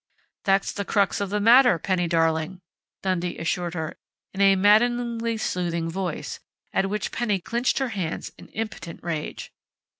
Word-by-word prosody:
"That's 195 -1 +2
the 200 - -3
crux 200 0 +1
of 200 - -1
the 210 +1 0
matter, 240 -1 +6
Penny 175 +1 0
darling!" 165 +2 +1 0.4
Dundee 180 -2 -1
assured 175 +1 -2
her 160 -1 -4 0.3
in 195 - -2
a 195 0 +6
maddeningly 230 +3 +3
soothing 170 -5 -2
voice, 180 -2 -4 0.3
at 195 - +1
which 210 +1 -2
Penny 215 -5 0
clinched 235 +7 0
her 265 -2 0
hands 185 -7 -4
in - - -14
impotent 215 -6 -6
rage. 165 -3 -4
195 Hz, 150 wpm, -25 LUFS, 170-220 Hz, 0.4 s, matter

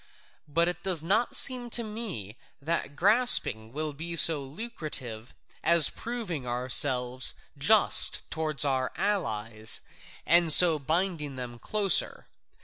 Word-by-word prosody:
But 165 +3 -1
it 175 -1 -4
does 180 -5 -2
not 215 +8 -1
seem 250 -2 +3
to 235 0 +1
me 210 - -8 0.2
that 145 -1 -5
grasping 195 - +3
will 155 +2 -5
be 170 +4 -7
so 155 -1 +5
lucrative 135 - -8 0.3
as 170 -3 +4
proving 205 - -7
ourselves 125 +1 0 0.2
just - - +3
toward 155 -2 -2
our 130 -2 -2
allies, 110 - -2 0.5
and 170 0 +5
so 165 -1 +6
binding 155 -1 -4
them 120 -2 -9
closer. 200 - 0
155 Hz, 120 wpm, -26 LUFS, 130-190 Hz, 0.5 s, so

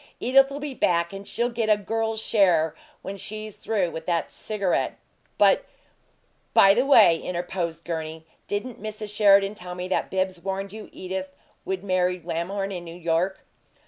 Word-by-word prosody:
Edith'll 270 +2 +4
be 290 -1 -5
back, 170 -6 +1
and 195 0 -8
she'll 240 +1 -1
get 230 -2 -1
a 210 - +5
girl's 225 +1 -2
share 180 -8 +3 0.3
when 200 +1 -5
she's 215 +1 -6
through 195 -6 -1
with 160 0 -7
that 170 -2 0
cigarette, 200 -4 -1 0.4
but - - +5 0.5
" - - -41
"By 195 0 +8
the 250 +6 +1
way," 215 -11 +7
interposed 175 -1 -4
Gurney, 160 -1 -5 0.2
"didn't 210 +3 -4
Mrs. 215 -1 -5
Sheridan 200 -1 +5
tell 180 -3 -7
me 180 0 -4
that - - 0
Bibbs 185 -2 -1
warned 195 +1 -4
you 215 0 -9
Edith 185 0 -5 0.3
would 190 0 -3
marry 180 -1 +1
Lamhorn 175 +4 -3
in 180 -2 -5
New 170 0 -9
York?" 170 +3 0
195 Hz, 165 wpm, -25 LUFS, 175-215 Hz, 0.5 s, By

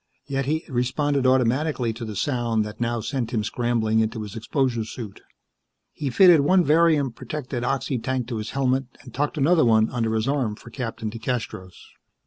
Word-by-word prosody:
Yet 135 -1 -2
he 155 +2 -1
responded 135 +1 0
automatically 130 0 +1
to 115 +2 -8
the 110 -2 -5
sound 115 -1 0
that 105 +2 -8
now 120 -1 0
sent 125 -1 -3
him 110 -3 0
scrambling 115 -1 0
into 110 0 -1
his 105 -2 -8
exposure 120 0 -1
suit. 110 -2 -8 0.7
He 145 -3 -3
fitted 175 +4 +7
one 180 +6 +4
varium 155 -3 +3
protected 130 -2 -5
oxy 135 0 -1
tank 130 0 -2
to 115 - -3
his 110 0 -4
helmet 135 0 0 0.2
and 125 - -13
tucked 145 +3 -1
another 155 +4 +4
one 110 -1 +3
under 115 -2 -1
his 110 +2 0
arm 135 -7 0
for 115 - -14
Captain 115 -3 -4
DeCastros. 110 -5 -4
125 Hz, 175 wpm, -24 LUFS, 115-140 Hz, 0.7 s, fitted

